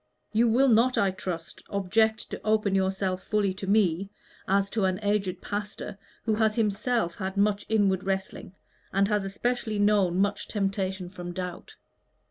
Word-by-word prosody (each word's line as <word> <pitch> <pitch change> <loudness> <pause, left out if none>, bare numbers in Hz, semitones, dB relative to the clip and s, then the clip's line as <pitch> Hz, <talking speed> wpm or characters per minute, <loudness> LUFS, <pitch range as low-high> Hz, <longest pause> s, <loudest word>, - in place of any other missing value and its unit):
You 230 +2 +4
will 250 +5 +4
not, 245 +2 +4
I 195 -1 +3
trust, 180 -3 -6
object 215 +3 +1
to - - -5
open 215 -2 +2
yourself 190 -1 0
fully 205 -3 0
to 190 +1 -7
me, 195 -2 +2 0.4
as 195 +1 +2
to 215 -4 +1
an 185 0 0
aged 195 -3 0
pastor 205 -1 -5 0.2
who 220 - +1
has 220 0 +2
himself 215 -3 0
had 190 +1 -5
much 205 0 +1
inward 200 -4 +2
wrestling, 190 -1 -3 0.4
and 195 +1 +3
has 210 -2 +1
especially 220 +2 -2
known 205 -4 +3
much 200 +1 0
temptation 195 -2 -2
from 175 -1 -7
doubt." 180 -1 -6
200 Hz, 155 wpm, -27 LUFS, 190-215 Hz, 0.4 s, You